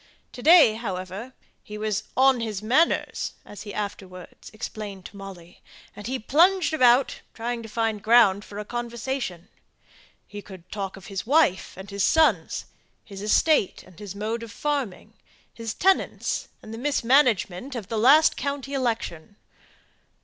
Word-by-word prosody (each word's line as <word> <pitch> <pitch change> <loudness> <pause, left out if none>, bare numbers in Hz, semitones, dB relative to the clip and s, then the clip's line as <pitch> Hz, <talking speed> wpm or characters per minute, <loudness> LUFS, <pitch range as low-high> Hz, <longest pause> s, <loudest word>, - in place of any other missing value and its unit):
To 245 - -10
day, 315 -5 +7
however, 200 +2 -6 0.3
he 210 - -9
was 210 -1 -2
"on 265 -1 +5
his 215 -3 -4
manners," 260 +10 +1
as 205 - -10
he 205 - -8
afterwards 190 -4 -7
explained 210 -3 -7
to - - -11
Molly; 190 -3 -11 0.3
and 205 - -8
he 260 +2 -2
plunged 340 - +3
about, 255 -2 +3
trying 235 +1 -3
to 225 - -10
find 225 -1 -1
ground 215 -3 +5
for 205 - -11
a 210 - -5
conversation. 240 -5 -4 0.8
He 205 0 -9
could 185 -3 -14
talk 195 -2 -5
of 195 - -13
his 195 +2 -6
wife 280 - +2
and 190 +1 -9
his 200 -1 -1
sons, 320 -1 +2 0.4
his 200 -2 -9
estate, 215 - +2
and 185 -2 -18
his 200 -2 -8
mode 220 +3 -3
of 230 -2 -8
farming; 280 -10 -3 0.4
his 225 -2 -6
tenants, 385 0 0 0.2
and 215 - -9
the 225 - -7
mismanagement 255 -4 +1
of 220 -6 -6
the 225 +1 -2
last 290 +7 +6
county 280 -1 -4
election. 225 - -3
220 Hz, 150 wpm, -25 LUFS, 200-260 Hz, 0.8 s, day